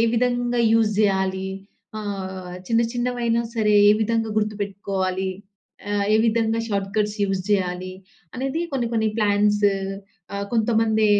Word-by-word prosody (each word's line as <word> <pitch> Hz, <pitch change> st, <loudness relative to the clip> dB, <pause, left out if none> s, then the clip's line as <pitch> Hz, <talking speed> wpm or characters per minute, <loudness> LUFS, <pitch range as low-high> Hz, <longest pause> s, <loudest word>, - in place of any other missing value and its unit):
విధంగా 245 Hz, 0 st, +1 dB
యూజ్ 225 Hz, -2 st, +4 dB
జేయాలి, 190 Hz, -2 st, +1 dB, 0.5 s
ఆహ్, 190 Hz, -3 st, -5 dB
చిన్న, 230 Hz, +2 st, +2 dB
చిన్నవైనా 240 Hz, -1 st, 0 dB
సరే 210 Hz, -2 st, +2 dB
ఏ -, -, +8 dB
విధంగా 225 Hz, 0 st, 0 dB
గుర్తుపెట్టుకోవాలి, 200 Hz, -3 st, -2 dB, 0.6 s
ఆహ్, 205 Hz, -1 st, +1 dB
ఏ -, -, +6 dB
విధంగా 225 Hz, 0 st, +1 dB
షార్ట్‌కట్స్ 205 Hz, +1 st, -1 dB
యూజ్ 195 Hz, -1 st, -1 dB
జేయాలి, 185 Hz, -2 st, 0 dB, 0.4 s
అనేది 270 Hz, +6 st, -2 dB
కొన్ని, 245 Hz, -4 st, 0 dB
కొన్ని 220 Hz, -1 st, +2 dB
ప్లాన్స్ 205 Hz, 0 st, +2 dB, 0.7 s
ఆహ్, 200 Hz, -, -2 dB
కొంతమంది 220 Hz, -1 st, +2 dB
210 Hz, 120 wpm, -23 LUFS, 195-230 Hz, 0.7 s, ఏ